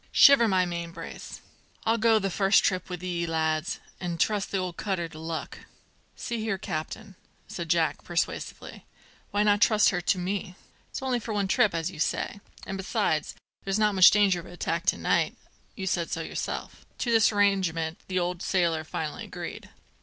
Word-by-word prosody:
"Shiver 275 -5 +7
my 185 -3 +3
mainbrace! 170 -1 -7 0.4
I'll 225 +1 +2
go 225 0 +5
the 195 -2 -1
first 195 +2 +4
trip 185 -1 0
with 180 -1 -6
ye, 175 -2 -2
lads, 160 0 -1 0.2
an' 175 -2 -3
trust 205 +3 +1
the 195 - -1
old 180 -2 -3
cutter 185 -4 -2
to 155 -1 -12
luck." 160 0 -5 0.6
"See 235 -1 -4
here, 220 -3 -1
captain," 190 +3 -5 0.3
said 170 -2 -6
Jack 165 -1 +1
persuasively 175 0 -4 0.4
"why 205 +1 +1
not 205 -1 +3
trust 215 -2 +5
her 180 -3 -1
to 180 - +1
me? 185 0 -3 0.3
It's - - -7
for 265 - -5
only 250 -2 +1
one 210 -3 -2
trip, 190 -1 +3
as 165 +2 -1
you 160 - -11
say; 200 - -1 0.3
and 195 - -4
besides, 190 +1 -1 0.3
there's 195 +1 0
not 210 -1 +3
much 185 -2 +9
danger 200 -3 +3
of 170 - -10
an - - -11
attack 175 - -2
to - - +3
night. - - +1 0.4
You 190 - -5
said 175 -2 -1
so 165 - -2
yourself." - - -5
To 235 - -1
this 225 -1 +5
arrangement 190 -5 +1
the 185 - -2
old 180 0 -1
sailor 170 -5 +1
finally 155 -1 -5
agreed. - - -7
185 Hz, 185 wpm, -27 LUFS, 170-205 Hz, 0.6 s, much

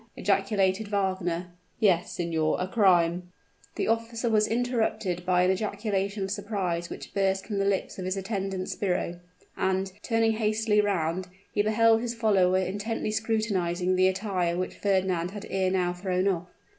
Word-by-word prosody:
ejaculated 195 0 +1
Wagner. 185 -3 -1 0.3
"Yes, 180 -5 +3
signor; 160 -3 0
a 180 - -1
crime 180 -4 +3 0.2
" - - -31
The - - -1
officer 230 +1 0
was 215 -1 +3
interrupted 220 -6 -1
by 180 -1 +4
an 185 - +4
ejaculation 200 0 -1
of 190 - -3
surprise 195 -5 -2
which - - -8
burst 195 -1 +1
from 205 -3 -3
the 195 - +1
lips 195 -1 -1
of 185 - -4
his 185 +1 -1
attendant 195 -2 -3
sbirro; 180 -3 -2 0.4
and, 190 0 0
turning 225 -1 +2
hastily 215 -1 +2
round, 185 -3 -1 0.3
he 205 - +2
beheld 225 +1 +4
his 240 0 -3
follower 195 -5 +3
intently 205 +4 -2
scrutinizing 195 -5 0
the 185 0 +4
attire 185 -3 0
which 185 0 -2
Fernand 185 -3 0
had 205 +1 -8
ere 190 -1 +1
now 180 -1 +1
thrown 185 +1 -1
off. 180 -2 0
195 Hz, 155 wpm, -27 LUFS, 180-215 Hz, 0.4 s, by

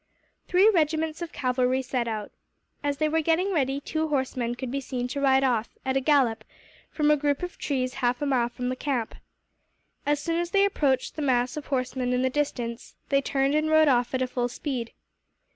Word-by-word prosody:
Three 370 +3 +5
regiments 320 -4 +1
of 340 - -5
cavalry 255 0 0
set 250 -2 -2
out. 215 -2 -4 0.5
As 285 -1 -1
they 310 - +1
were 320 +1 +1
getting 335 +5 +1
ready, 275 -3 +1
two 315 +2 -2
horsemen 255 -4 -1
could 250 0 -5
be 275 +1 -2
seen 250 -2 -3
to 280 +3 -3
ride 265 -1 +4
off, 240 -4 +1 0.2
at 265 0 0
a - - +4
gallop, 255 -6 +2 0.5
from 300 -1 +2
a - - +6
group 290 +1 0
of 355 - -6
trees 255 -3 -1
half 245 0 +1
a 290 - -1
mile 250 -4 +1
from 250 +1 -4
the 255 - -1
camp. 255 -5 -2 0.9
As 290 0 +1
soon 330 +2 -1
as 345 0 -2
they 395 +2 +4
approached 285 -9 0
the - - -2
mass 250 -3 +1
of 300 - -6
horsemen 255 -2 -1
in 250 +1 +1
the 260 - +1
distance, 245 -5 -3
they 275 -1 +3
turned 275 0 0
and 305 +1 +1
rode 315 0 +5
off 245 -1 +2
at 255 0 0
full 245 -1 -1
speed. 245 -2 -4
270 Hz, 205 wpm, -26 LUFS, 250-300 Hz, 0.9 s, a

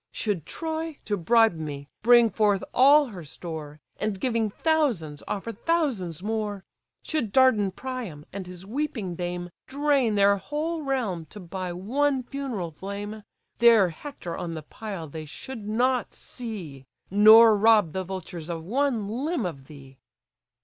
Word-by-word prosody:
Should 195 -8 -2
Troy, 320 -1 -4
to 210 - 0
bribe 225 +4 +4
me, 145 -3 -6
bring 235 0 +6
forth 205 -3 +2
all 280 +2 +6
her 185 -6 -8
store, 155 -1 -8 0.2
And 210 -2 -2
giving 230 -3 0
thousands, 230 - 0
offer 205 +3 -3
thousands 225 - -1
more; 210 -2 -3 0.4
Should 260 -10 -2
Dardan 225 -5 +4
Priam, 215 - -6
and 190 -2 -6
his 180 0 -10
weeping 225 -5 -3
dame, 175 0 -4 0.2
Drain 275 -5 +1
their 200 0 +5
whole 305 - -3
realm 230 - -2
to 210 - -11
buy 185 0 -5
one 260 +9 0
funeral 245 - -4
flame: 200 +5 -6 0.4
Their 230 -5 +6
Hector 175 - -7
on 165 -1 -4
the 155 - -6
pile 195 -1 -7
they 155 +1 -7
should 215 - -8
not 250 +3 +1
see, 175 - -8 0.2
Nor 215 +2 +8
rob 210 -5 +4
the 190 - -2
vultures 180 -3 -7
of 165 -1 -4
one 240 -1 0
limb 260 - -2
of 140 -6 -6
thee." 135 -3 -14
210 Hz, 145 wpm, -26 LUFS, 175-255 Hz, 0.4 s, Nor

